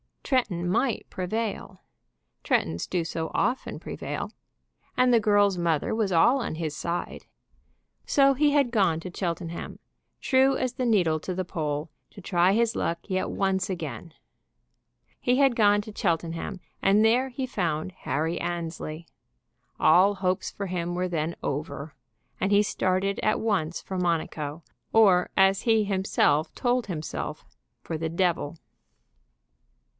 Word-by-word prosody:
Tretton 190 -10 0
might 235 +4 0
prevail. 210 +4 -4 0.6
Trettons 80 +1 0
do 180 -2 0
so 160 0 -3
often 250 +2 -1
prevail. - - -5 0.6
And 250 -1 +4
the 235 - +6
girl's 205 -3 +3
mother 165 -3 0
was 220 -3 0
all 240 +12 +5
on 195 - -3
his 155 -2 -3
side. 170 +3 -4 0.8
So 275 -1 +4
he 290 +2 +3
had 280 -4 +2
gone 190 -8 +2
to 180 - -7
Cheltenham, 170 -2 -4 0.4
true 265 0 +3
as 255 -1 -1
the 255 0 -2
needle 180 -9 +2
to 185 +3 -5
the 185 - -1
pole, 155 -2 -3 0.2
to 200 - -12
try 180 0 +3
his 230 +1 +1
luck 170 0 -1
yet 185 0 -1
once 190 -1 0
again. 170 -2 -5 1.1
He 250 - +2
had 270 -3 +4
gone 205 -2 +4
to 210 0 -10
Cheltenham, 170 +1 -2 0.2
and 200 +2 +4
there 240 +4 +3
he 260 +1 -4
found 175 -8 -2
Harry 165 -2 -2
Annesley. 165 -1 -4 0.7
All 190 +5 +5
hopes 185 -1 -1
for 200 - -5
him 175 -1 -3
were 180 +1 -1
then 165 -1 -2
over 145 +1 -4 0.5
and 195 +1 +1
he 205 +1 +5
started 195 0 0
at 215 - +1
once 185 -7 -1
for 190 - -5
Monaco; 160 -3 -2 0.3
or, 195 -5 +5
as 195 0 +4
he 225 -3 +3
himself 190 -6 +1
told 245 -2 0
himself, 160 -5 -5 0.4
for 160 - -4
the 160 0 -2
devil. 170 -2 0
185 Hz, 140 wpm, -26 LUFS, 165-220 Hz, 1.1 s, the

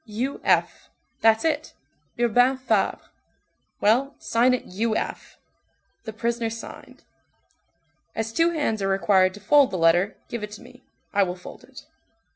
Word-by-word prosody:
"U. 240 +6 -4
F. - - +1 0.3
That's 225 +4 +3
it. 310 -1 -1 0.4
Urbain 245 +3 +3
Fabre. 225 -6 0 0.8
Well, 250 +7 +2
sign 245 +2 +2
it 250 - -7
U. 220 +4 -2
F." - - -5 0.7
The 220 - -5
prisoner 235 +1 -2
signed. 225 0 -10 1.1
"As 225 0 -3
two 330 +4 +3
hands 290 -11 -1
are 195 - 0
required 190 -1 +2
to - - -11
fold 270 +7 +4
the 190 - -4
letter, 175 +4 +2
give 235 - -5
it 210 - -5
to 215 - -10
me, - - -16 0.3
I 200 - +3
will 180 -2 0
fold 180 - -12
it." - - -14
225 Hz, 150 wpm, -24 LUFS, 200-250 Hz, 1.1 s, fold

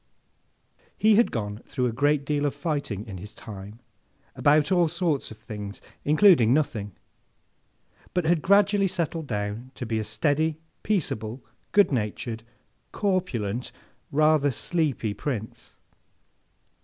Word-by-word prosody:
He 215 +1 +5
had 230 +3 +5
gone 105 -2 -3
through 125 - -1
a 120 - +1
great 145 +4 +1
deal 145 0 +1
of 140 - -3
fighting, 140 - -3
in 95 -5 -8
his 105 +3 -10
time, 105 -2 -9 0.6
about 150 +4 +3
all 175 -2 +4
sorts 165 -3 -1
of 110 - -11
things, 105 -2 -7 0.2
including 150 - +6
nothing; 105 -10 -1 1.2
but, 180 -2 +1
had 165 -1 +3
gradually 200 +1 +4
settled 165 -3 -2
down 105 +2 -3
to 125 - -5
be 110 -1 -1
a - - -1
steady, 145 +9 0 0.2
peaceable, 120 - -2 0.3
good 205 -5 +5
natured, 110 -1 -2 0.5
corpulent, 130 - -1 0.4
rather 155 0 +4
sleepy 140 -6 -1
Prince. 110 -3 -5
140 Hz, 125 wpm, -26 LUFS, 110-165 Hz, 1.2 s, including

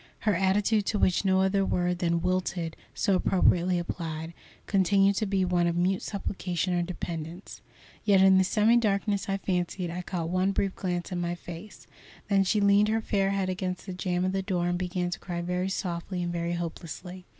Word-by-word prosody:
Her 215 - +2
attitude, 200 +3 +2
to 215 - 0
which 185 -2 +2
no 190 0 +3
other 195 +1 +2
word 180 -1 0
than 170 -1 0
"wilted" 180 -2 -1 0.2
so 200 - +1
appropriately 180 -1 +3
applied, 165 -1 -4 0.3
continued 195 0 +3
to 215 - 0
be 195 -1 +1
one 175 -1 +2
of 170 - 0
mute 185 +2 +1
supplication 185 -3 -2
or 175 - +1
dependence. 170 0 -6 0.4
Yet 200 -2 +4
in 190 0 +6
the - - +5
semi 215 +5 +3
darkness 200 -2 0
I 195 - +1
fancied 180 -2 -2
I 180 +1 -4
caught 175 -2 -3
one 185 +2 +1
brief 195 0 -1
glance 180 -1 -3
at 180 - -2
my 175 0 -2
face. 175 +4 -10 0.4
Then 195 -1 +4
she 200 +3 +1
leaned 200 +1 +4
her 220 +1 +1
fair 200 -3 0
head 195 -1 0
against 185 -1 -3
the 190 - -5
jam 180 0 -1
of 185 - +1
the 195 0 -1
door 180 -2 -1
and 175 0 -1
began 180 -1 -2
to - - -4
cry 175 -2 -5
very 180 +2 -1
softly 180 -1 -3
and 175 0 -2
very 170 0 -2
hopelessly. 175 +2 -6
185 Hz, 195 wpm, -28 LUFS, 175-195 Hz, 0.4 s, in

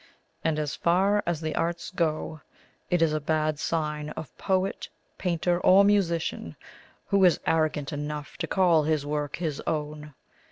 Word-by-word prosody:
And 160 -2 +1
as 150 -2 -2
far 195 +4 +2
as 170 -2 -1
the 155 -1 -2
arts 170 +1 -2
go, 160 -3 -2 0.5
it 175 -2 +3
is 155 -2 +2
a 155 - 0
bad 155 0 0
sign 150 -2 -2
of 155 - -8
poet, 190 0 -1 0.3
painter, 175 -1 0
or 190 +2 +6
musician, 170 - 0 0.5
who 200 -1 +3
is 180 -2 +5
arrogant 155 -3 0
enough 150 0 -5
to - - -3
call 175 -5 +4
his 150 -1 0
work 145 -1 -2
his 160 -5 -3
own. 150 -2 -3
160 Hz, 155 wpm, -27 LUFS, 150-175 Hz, 0.5 s, or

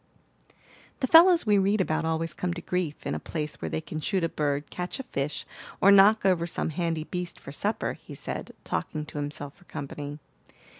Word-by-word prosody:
"The - - +3
fellows 335 +4 +7
we 205 -2 +4
read 200 +2 +2
about 160 -3 +1
always 160 0 -1
come 175 +1 -2
to 170 - -6
grief 180 -5 -2
in - - -1
a - - -2
place 150 -2 -5
where - - -2
they 160 - -2
can 155 0 -6
shoot 190 +2 0
a 165 - +1
bird, 145 -1 -1
catch 180 +8 -4
a - - -3
fish, 145 - -3 0.3
or 200 - +7
knock 200 +2 +7
over 175 -3 +3
some 165 - -2
handy 165 -1 -1
beast 180 +1 -5
for - - -9
supper," 205 +9 -1
he - - -11
said, - - -5
talking 155 -1 -3
to 150 - -6
himself 145 -1 -5
for 180 - -21
company. 145 0 -6
165 Hz, 200 wpm, -27 LUFS, 150-195 Hz, 0.3 s, fellows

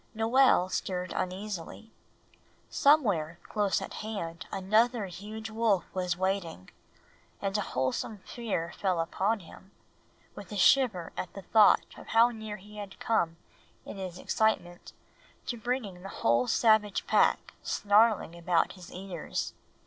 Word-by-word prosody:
Noel 225 -3 +4
stirred 180 -1 -3
uneasily. 195 +3 -5 0.8
Somewhere 205 - +3
close 205 -2 0
at - - -8
hand 170 -7 -5
another 215 +4 +2
huge 210 +4 -8
wolf 220 -4 +2
was 180 -2 -1
waiting; 185 - -2 0.7
and 195 0 -2
a 210 - +2
wholesome 130 - -2
fear 205 -8 -3
fell 185 -4 0
upon 195 +6 0
him, 185 +2 -15 0.6
with 205 - -11
a 205 - -4
shiver 205 -5 +3
at 185 - -4
the 195 - -9
thought 215 +1 +5
of - - -13
how 230 +2 +5
near 220 -2 -7
he 210 +2 -14
had 200 -2 -8
come 170 -7 0 0.5
in - - -8
his 185 -2 -6
excitement 180 -4 -1 0.5
to 245 - -3
bringing 225 -6 -3
the 195 - -8
whole 120 -4 +1
savage 215 - +3
pack - - +2
snarling 205 -4 +2
about 170 -1 +1
his 180 -3 -12
ears. 185 -3 -5
195 Hz, 135 wpm, -29 LUFS, 180-220 Hz, 0.8 s, thought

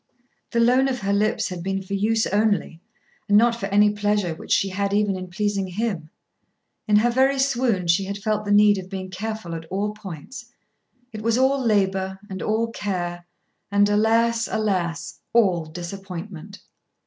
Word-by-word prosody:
The 235 - 0
loan 250 +3 +4
of 255 -3 -2
her 200 0 0
lips 215 +2 +1
had 180 -2 -6
been 195 +2 -2
for 190 - -7
use 220 +3 +1
only, 205 -5 0 0.5
and 205 - +6
not 235 +2 +5
for 210 -4 -4
any 205 +1 +4
pleasure 205 -4 0
which 160 - -10
she 195 - +3
had 200 +1 -1
even 205 -2 +2
in 185 0 -6
pleasing 200 +1 -1
him. 185 -4 -3 0.8
In 210 - +3
her 230 +3 +4
very 265 +3 +3
swoon 250 -8 +1
she 170 +3 +2
had 200 +1 -4
felt 210 +1 -1
the 205 - -3
need 205 -1 +5
of 185 0 -9
being 190 -1 -6
careful 215 -2 -5
at 165 0 -6
all 200 +5 -2
points. 210 - -9 0.7
It 215 - -6
was 230 +1 +1
all 265 +1 +2
labour, 190 -3 +1
and 190 - -5
all 225 +2 0
care, 175 -5 -4 0.4
and, 205 0 +4
alas, 225 +2 +2
alas, 185 -6 -2
all 190 -8 +3
disappointment! 180 +3 -8
205 Hz, 170 wpm, -23 LUFS, 190-220 Hz, 0.8 s, and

